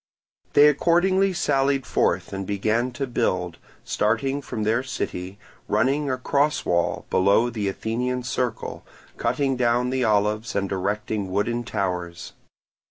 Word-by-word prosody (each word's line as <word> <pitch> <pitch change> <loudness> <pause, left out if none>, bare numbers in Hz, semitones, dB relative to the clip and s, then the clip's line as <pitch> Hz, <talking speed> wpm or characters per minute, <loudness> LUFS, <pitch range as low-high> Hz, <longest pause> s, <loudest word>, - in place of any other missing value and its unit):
They 145 +1 +8
accordingly 180 +6 +3
sallied 135 -6 +1
forth 90 -3 0
and 95 -1 -4
began 110 +5 0
to 135 +3 -2
build, 90 -8 -1 0.2
starting 135 +6 0
from 110 -5 -4
their 110 +3 +2
city, 95 -7 -5 0.3
running 135 +8 +1
a 130 - 0
cross 140 +3 +1
wall 85 -1 0
below 100 +6 +3
the 105 -3 -2
Athenian 125 +5 -2
Circle, 120 -1 -3 0.3
cutting 135 +3 0
down 120 0 +2
the 130 -1 0
olives 105 +1 +1
and 100 -1 -1
erecting 100 +1 -2
wooden 115 +5 -1
towers. 90 -5 -3
115 Hz, 130 wpm, -24 LUFS, 100-130 Hz, 0.3 s, They